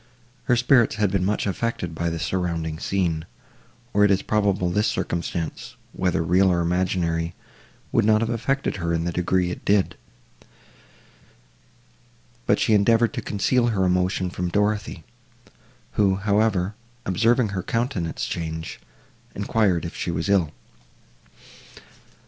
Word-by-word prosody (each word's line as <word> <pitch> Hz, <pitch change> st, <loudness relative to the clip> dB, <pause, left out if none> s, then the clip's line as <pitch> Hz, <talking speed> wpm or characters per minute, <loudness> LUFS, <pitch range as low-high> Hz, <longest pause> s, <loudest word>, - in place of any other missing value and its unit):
Her 125 Hz, -, +3 dB
spirits 120 Hz, -1 st, +4 dB
had 105 Hz, -2 st, +1 dB
been 95 Hz, -2 st, +1 dB
much 105 Hz, +3 st, 0 dB
affected 100 Hz, -4 st, -2 dB
by 85 Hz, +1 st, -1 dB
the 85 Hz, -, -3 dB
surrounding 80 Hz, -2 st, -2 dB
scene, 85 Hz, -5 st, -1 dB, 0.7 s
or 105 Hz, -, +4 dB
it 105 Hz, -, +5 dB
is 100 Hz, -1 st, +2 dB
probable 100 Hz, -4 st, +1 dB
this 105 Hz, +4 st, +1 dB
circumstance, 85 Hz, -1 st, -3 dB, 0.2 s
whether 90 Hz, -3 st, 0 dB
real 95 Hz, +3 st, +4 dB
or 85 Hz, -, +1 dB
imaginary, 85 Hz, -1 st, 0 dB, 0.6 s
would -, -, +3 dB
not 110 Hz, +1 st, +4 dB
have 115 Hz, -, 0 dB
affected 130 Hz, +1 st, -1 dB
her 85 Hz, -2 st, -1 dB
in 85 Hz, -, -1 dB
the 85 Hz, -, -1 dB
degree 90 Hz, +1 st, 0 dB
it -, -, -7 dB
did; 100 Hz, -1 st, +2 dB, 2.5 s
but -, -, +4 dB
she 110 Hz, -, +2 dB
endeavoured 115 Hz, +2 st, +4 dB
to -, -, -3 dB
conceal 120 Hz, +4 st, +1 dB
her 105 Hz, -5 st, +1 dB
emotion 90 Hz, 0 st, +1 dB
from 90 Hz, 0 st, -3 dB
Dorothée, 105 Hz, -3 st, -1 dB, 0.9 s
who, 100 Hz, -5 st, +2 dB
however, 100 Hz, -1 st, +1 dB, 0.3 s
observing 115 Hz, +4 st, +2 dB
her 95 Hz, -1 st, -3 dB
countenance 115 Hz, -, -2 dB
change, 80 Hz, -1 st, -5 dB, 0.6 s
enquired 100 Hz, -4 st, +1 dB
if 85 Hz, -, -6 dB
she -, -, -3 dB
was 85 Hz, +3 st, -2 dB
ill. 95 Hz, -6 st, +3 dB
95 Hz, 135 wpm, -24 LUFS, 85-105 Hz, 2.5 s, it